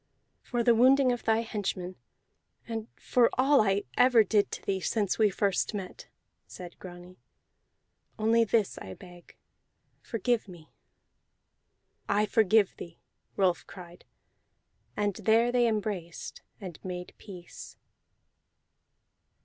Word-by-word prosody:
"For 240 -1 -2
the 235 - +5
wounding 255 +3 +5
of 245 - -4
thy 225 0 +2
henchmen, 195 -5 -4 0.7
and 225 -1 -5
for 245 -2 +2
all 270 +1 +4
I 200 -1 +1
ever 250 -3 +5
did 205 0 +1
to - - -6
thee 195 -1 -1
since 200 +2 -1
first 200 +2 0
we - - -2
met," 190 -2 -9 0.4
said 175 -1 -11
Grani, 180 0 -12 1.0
"only 225 +2 +3
this 220 -2 0
I 95 0 -9
beg: 175 -1 -15 0.7
Forgive 235 -1 -1
me!" 170 -4 -14 1.4
"I 205 +1 +2
forgive 215 -1 +3
thee!" 170 -1 -10 0.4
Rolf 185 -3 +1
cried, 175 -2 -12 0.9
and 205 -2 -1
there 230 +2 +3
they 245 -1 +3
embraced 205 -6 -4 0.2
and 185 -6 -9
made 180 -1 -6
peace. 180 -4 -11
205 Hz, 115 wpm, -28 LUFS, 180-230 Hz, 1.4 s, the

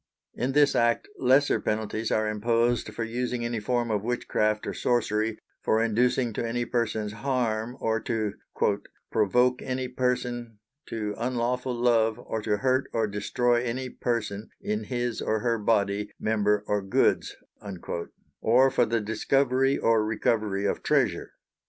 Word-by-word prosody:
In 130 +2 -2
this 145 0 +4
act 115 0 +2
lesser 135 +3 +4
penalties 110 +1 -2
are 110 0 +2
imposed 115 +2 +1
for 115 +2 -4
using 120 +1 -2
any 120 -1 -2
form 120 +2 0
of 105 -2 0
witchcraft 110 -3 0
or - - -3
sorcery, 110 -2 0 0.2
for 110 - +2
inducing 120 +1 +1
to - - -2
any 120 +1 -1
persons 110 -3 -1
harm, 120 -1 -1
or 110 0 0
to 110 -3 -2 0.8
"provoke 125 +4 +3
any 130 0 -2
person 125 -2 -2 0.3
to 105 -2 -3
unlawfull 125 0 -1
love 115 -2 +3
or 110 - -4
to 105 -1 0
hurt 130 +3 +1
or 115 -1 +2
destroy 120 +4 +1
any 125 +2 -3
person 110 -4 -3
in 105 0 -2
his 120 -1 -2
or 110 -1 0
her 115 -2 +1
bodye, 105 -1 +1
member 105 -1 +1
or 105 -1 0
goods," 95 0 +1 1.1
or 130 +4 +5
for - - +2
the 115 0 0
discovery 130 +5 +2
or 115 -1 +3
recovery 105 -2 0
of - - 0
treasure. - - +1
115 Hz, 145 wpm, -27 LUFS, 110-125 Hz, 1.1 s, or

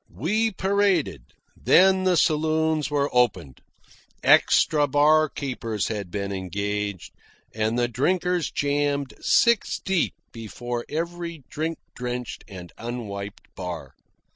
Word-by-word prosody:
We 205 - 0
paraded. 190 - +1 0.3
Then 190 0 +4
the 180 -2 +3
saloons 155 -1 +1
were 145 -1 0
opened. 90 - +1 0.6
Extra 150 -2 +4
barkeepers 140 -6 +1
had 105 -4 -4
been 100 +1 -3
engaged, 100 +1 -3 0.4
and 110 +2 0
the 120 0 +2
drinkers 175 +7 0
jammed 145 -1 -1
six 235 -3 +3
deep 190 -4 0 0.2
before 120 +1 -5
every 170 -1 -4
drink 160 +2 -2 0.2
drenched 125 -1 -5
and 90 -3 -10
unwiped 105 -4 -6
bar. 90 -3 -6
140 Hz, 105 wpm, -24 LUFS, 105-165 Hz, 0.6 s, Then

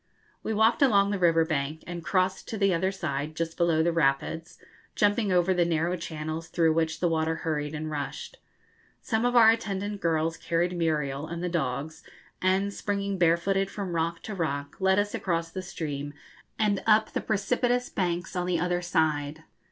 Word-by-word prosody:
We - - -3
walked 220 +4 +3
along 200 -7 +4
the 200 - -1
river 165 -2 +4
bank, 155 -1 -2
and 175 -1 -6
crossed 185 +2 0
to 220 - -4
the 195 -2 +3
other 185 +3 +1
side 155 -5 -3
just 165 0 -3
below 165 -2 +2
the 170 - +2
rapids, 160 +2 0 0.4
jumping 205 0 +2
over 180 +1 +3
the 175 -1 +3
narrow 170 +1 0
channels 160 -1 -5
through 165 -2 +2
which 160 0 -1
the 175 - +3
water 160 0 0
hurried 150 -1 -2
and 155 +1 -4
rushed. 150 - -5 0.7
Some 225 0 0
of 245 0 +1
our 225 -2 +8
attendant 205 -2 -3
girls 165 0 0
carried 175 +1 -1
Muriel 150 -4 -1
and 170 +1 -5
the 180 - -1
dogs, 155 -2 -3 0.4
and, 190 +2 +1
springing 200 -2 -2
barefooted 185 +3 +2
from 195 -4 -5
rock 165 0 -1
to 215 - -5
rock, 145 -6 -3
led 190 0 +3
us 205 0 0
across 165 -2 -2
the 185 - -4
stream 145 -6 -5 0.4
and 205 -2 +1
up 215 0 +4
the - - -2
precipitous 245 +4 0
banks 175 -1 -2
on 180 0 -1
the 175 -2 +1
other 175 +1 0
side. 155 -3 0
170 Hz, 180 wpm, -27 LUFS, 160-195 Hz, 0.7 s, our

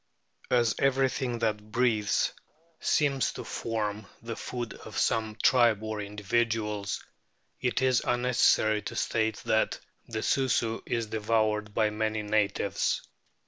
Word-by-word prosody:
As 120 -3 +3
every 135 -1 +3
thing 125 -3 -2
that 110 -2 -2
breathes 115 -4 +2 0.5
seems 140 -4 +1
to - - -6
form 105 -2 -3 0.2
the 115 -1 -4
food 120 -2 -5
of - - -10
some 110 -1 0
tribe 115 -4 +4
or 110 -1 -3
individuals, 105 0 -1 0.6
it 125 +1 0
is 130 -2 +3
unnecessary 120 -3 +3
to - - -6
state 110 -1 0
that 110 - +1 0.3
the 110 -1 -4
Susu 120 -4 +1
is 115 -1 0
devoured 105 -1 0
by 110 -1 +2
many 110 0 -1
natives. 105 -1 0
110 Hz, 125 wpm, -29 LUFS, 105-120 Hz, 0.6 s, tribe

